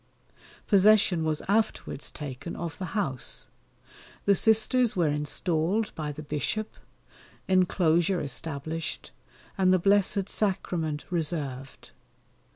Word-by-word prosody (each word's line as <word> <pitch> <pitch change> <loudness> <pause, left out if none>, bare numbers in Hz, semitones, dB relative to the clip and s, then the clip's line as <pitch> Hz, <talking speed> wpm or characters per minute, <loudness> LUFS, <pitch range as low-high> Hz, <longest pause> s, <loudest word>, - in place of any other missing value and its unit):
Possession 200 -4 +5
was 155 -1 -1
afterwards 205 -7 0
taken 145 +2 -7
of 170 -2 -5
the 185 +1 -4
house. 135 - -2 0.8
The 200 - +5
Sisters 220 +4 +3
were 175 -4 +2
installed 165 +7 -1
by 150 -2 -4
the 150 +1 -8
Bishop, 150 +9 -3 0.7
enclosure 180 -1 +3
established, 155 +3 -4 0.5
and 185 -1 +4
the 185 - +5
Blessed 200 +1 +2
Sacrament 170 -8 -1
reserved. 145 -6 -4
170 Hz, 100 wpm, -27 LUFS, 150-200 Hz, 0.8 s, Possession